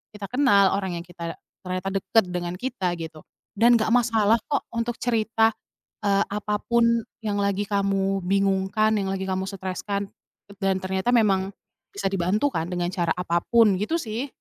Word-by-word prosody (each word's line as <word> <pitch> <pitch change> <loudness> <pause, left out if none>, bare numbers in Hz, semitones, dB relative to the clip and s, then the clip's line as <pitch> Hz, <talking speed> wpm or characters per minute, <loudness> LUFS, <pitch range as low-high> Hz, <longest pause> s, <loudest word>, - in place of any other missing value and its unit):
kita 200 -2 -7
kenal, 205 -8 +4
orang 190 -3 -3
yang 170 - -6
kita 170 -1 -7 0.3
ternyata 185 +1 -3
dekat 195 +3 +2
dengan 175 0 -3
kita, 195 -4 -2
gitu. 160 -2 -8 0.3
Dan 235 +3 +5
nggak 220 -1 +1
masalah 230 -2 +3
kok 285 - 0
untuk 230 0 -2
cerita, 225 -1 +1 0.5
eee, 200 -1 +2
apa 210 +1 -1 0.2
pun 235 -1 +3 0.2
yang 215 -3 -2
lagi 200 0 0
kamu 195 -1 0
bingungkan, 195 +3 +1
yang 195 -2 -1
lagi 190 0 -3
kamu 190 0 -1
streskan. 195 +1 -4 0.5
Dan 190 0 0
ternyata 190 +5 -1
memang, 195 -5 +3 0.4
bisa 195 -1 -1
dibantu 195 +9 +1
kan 165 -5 -2
dengan 175 -1 -2
cara 170 -3 0
apa 175 -1 0
pun, 230 -3 +5
gitu 215 +11 -1
sih. 235 -1 -4
200 Hz, 160 wpm, -24 LUFS, 190-225 Hz, 0.5 s, Dan